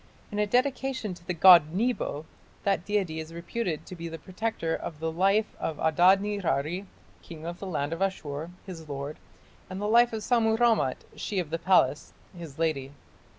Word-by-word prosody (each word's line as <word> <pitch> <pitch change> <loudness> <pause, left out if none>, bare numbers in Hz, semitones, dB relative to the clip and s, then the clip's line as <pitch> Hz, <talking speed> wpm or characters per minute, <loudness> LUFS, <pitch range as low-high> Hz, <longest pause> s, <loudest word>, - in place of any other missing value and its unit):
In 205 - -3
a 210 - +2
dedication 255 -2 0
to 175 0 -15
the 180 - -1
god 170 -2 +7
Nebo, 210 -9 -1 0.4
that 195 -3 0
deity 190 -6 -1
is 160 0 -7
reputed 170 -1 -3
to 185 - -9
be 170 -1 -6
the 165 0 -6
protector 185 0 -3
of 150 - -7
"the 160 0 -2
life 195 +6 +1
of 160 - -3
Adad 180 +5 +5
nirari, 190 -3 -1 0.3
king 160 -2 -10
of 170 +1 -5
the 195 - -6
land 155 -3 -2
of 165 - -6
Ashur, 160 -5 -2 0.2
his 165 -5 -9
lord, 140 +1 -5 0.5
and 185 +1 -5
the 205 - -2
life 235 +3 +5
of 220 -1 -4
Sammu 225 -2 +2
rammat, 225 - +2
she 205 - -4
of 170 -5 -2
the 165 - -1
palace, 160 -7 +2 0.2
his 165 -5 -9
lady". 145 -4 -1
180 Hz, 185 wpm, -28 LUFS, 160-210 Hz, 0.5 s, god